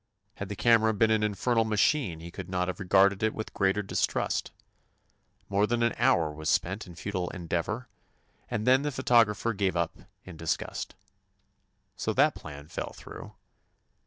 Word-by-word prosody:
Had 100 - -5
the 100 - -4
cam 115 +2 +4
era 110 -1 +2
been 110 +2 +3
an 110 -1 +3
infernal 115 +3 +1
machine 105 - +1
he 85 +1 -9
could 90 +1 -8
not 90 -1 0
have 90 - -4
regarded 95 +1 +4
it 110 0 +1
with 110 - -6
greater 95 +1 +1
dis 95 - +1
trust. - - -2 1.0
More 100 +1 +2
than 120 0 0
an 115 - +2
hour 120 -11 +3
was 80 +1 -4
spent 95 +5 0
in 85 - -11
futile 90 -1 -3
endeavor, 90 +8 -3 0.6
and 110 -2 -2
then 130 +1 +5
the 150 - -1
pho 130 0 -5
tographer 115 -2 +3
gave 95 -2 0
up 85 -1 -1 0.3
in 90 -3 -10
disgust. 80 0 -3 1.0
So - - -2
that - - +4
plan 75 -1 -10
fell 80 - -5
through. - - -11
100 Hz, 175 wpm, -28 LUFS, 90-115 Hz, 1.0 s, then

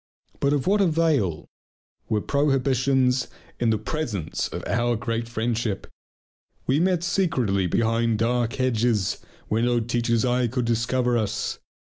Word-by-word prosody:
But 140 - +2
of 145 -3 0
what 205 +2 +3
avail 155 - +1 0.6
were 105 -1 +1
prohibitions 135 -2 +2 0.3
in 120 - +2
the 110 - +2
presence 110 - -3
of - - -6
our 120 0 +1
great 115 0 -3
friendship! 115 -3 -2 0.8
We 135 +3 +2
met 180 -1 +2
secretly 135 - +1
behind 115 +3 +1
dark 120 +1 0
hedges, 115 -5 +1 0.3
where 110 +2 0
no 120 0 +2
teacher's 115 0 0
eyes 125 -1 +1
could 125 -1 -1
discover 120 +1 +1
us. 105 -1 -2
120 Hz, 130 wpm, -24 LUFS, 115-135 Hz, 0.8 s, what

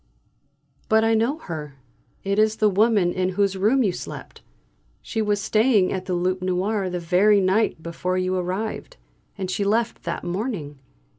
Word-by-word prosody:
"But 220 0 +4
I 225 0 +3
know 230 +7 +1
her! 155 - -7 0.5
It 200 +1 0
is 215 0 +3
the 215 -2 +2
woman 200 -3 +3
in 185 0 0
whose 200 -1 +2
room 220 +8 +2
you 200 - +2
slept! 175 - -9 0.6
She 225 - -2
was 210 -1 0
staying 215 -1 +2
at 185 -1 -4
the 185 -1 -1
'Loup 185 +1 -1
Noir' 185 +2 -1
the 180 - -3
very 190 +5 +4
night 190 -3 +1
before 180 +2 -2
you 185 0 0
arrived, 195 - -4 0.4
and 190 -2 -3
she 200 - -1
left 225 +3 0
that 170 - -4
morning. 175 - -4
195 Hz, 165 wpm, -23 LUFS, 185-220 Hz, 0.6 s, But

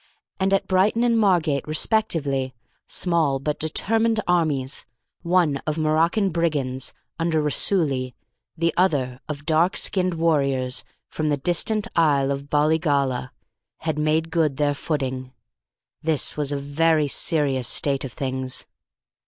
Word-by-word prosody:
And, 190 0 +1
at 195 - +2
Brighton 195 +5 +2
and 240 -1 +2
Margate 170 - +1
respectively, 150 - 0 0.3
small 165 -6 +1
but 150 +2 -3
determined 225 +8 +1
armies, 150 -7 0 0.3
the 170 - -9
one 170 -6 +3
of 155 +1 -1
Moroccan 165 +6 +1
brigands, 145 -6 -1 0.2
under 165 -1 +1
Raisuli, 145 - 0 0.4
the 165 0 0
other 135 -9 0
of 145 -1 -6
dark 165 +3 +2
skinned 185 -2 +1
warriors 140 -6 0 0.2
from 155 -1 -3
the 145 - +1
distant 180 +8 0
isle 140 -4 +2
of 140 +1 -5
Bollygolla, 145 -4 +1 0.5
had 160 -2 -2
made 155 +2 0
good 155 -5 0
their 145 -1 +1
footing. 130 -3 -3 0.7
This 155 -2 +2
was 145 -2 +1
a 145 - -1
very 150 +2 +1
serious 140 -4 +2
state 140 -2 +2
of 135 - -6
things. 130 0 -2
155 Hz, 130 wpm, -23 LUFS, 140-170 Hz, 0.7 s, one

